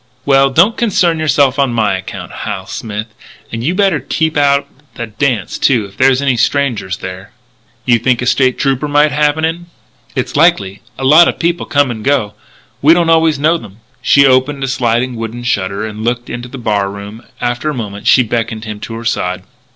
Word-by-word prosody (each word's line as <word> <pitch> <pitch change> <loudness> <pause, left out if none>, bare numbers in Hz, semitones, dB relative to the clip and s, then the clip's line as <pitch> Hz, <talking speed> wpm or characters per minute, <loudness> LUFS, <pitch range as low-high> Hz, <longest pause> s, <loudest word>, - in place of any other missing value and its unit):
"Well, 135 -1 +4
don't 175 - +3
concern 180 -8 +1
yourself 140 -3 +2
on 135 -3 +1
my 105 -4 +1
account, 95 - -7
Hal 95 - -5
Smith. 105 +2 -6 0.4
And 115 0 -4
you'd 175 +8 -1
better 195 -6 +2
keep 160 +4 -1
out 140 -1 +3
of - - -24 0.3
the 120 - -4
dance, 110 -2 -2
too, 120 -6 +2
if 100 0 -14
there 130 +5 +4
are 130 +2 0
any 130 -3 +2
strangers 115 -7 0
there." 95 0 -8 0.5
"You 120 -2 +3
think 125 +1 +1
a 125 - -2
State 130 0 +2
Trooper 135 +1 0
may 145 +1 +3
happen 150 +1 +1
in?" 170 +2 -4 0.5
"It's - - -3
likely. 100 0 +2 0.2
A 135 - -6
lot 155 +6 +7
of - - -1
people 170 0 -1
come 140 -3 +2
and 110 -2 -7
go. 110 -7 0 0.5
We 155 +4 +6
don't 170 -1 +2
always 160 -2 +3
know 160 +4 +2
them." 100 -7 -13 0.2
She 140 0 +5
opened 135 +2 +2
a - - -1
sliding 120 -1 0
wooden 115 +2 -6
shutter 100 -3 -1
and 110 0 -7
looked 120 +1 -2
into 120 +1 -6
the 135 - -8
bar 105 -5 -1
room. 100 +3 -9 0.2
After 120 +5 -2
a - - -2
moment 105 -4 -6
she 130 - +6
beckoned 115 -1 -3
him 105 -1 -6
to 115 +2 -7
her 115 +1 -7
side. 90 -4 -2
125 Hz, 205 wpm, -14 LUFS, 110-145 Hz, 0.5 s, lot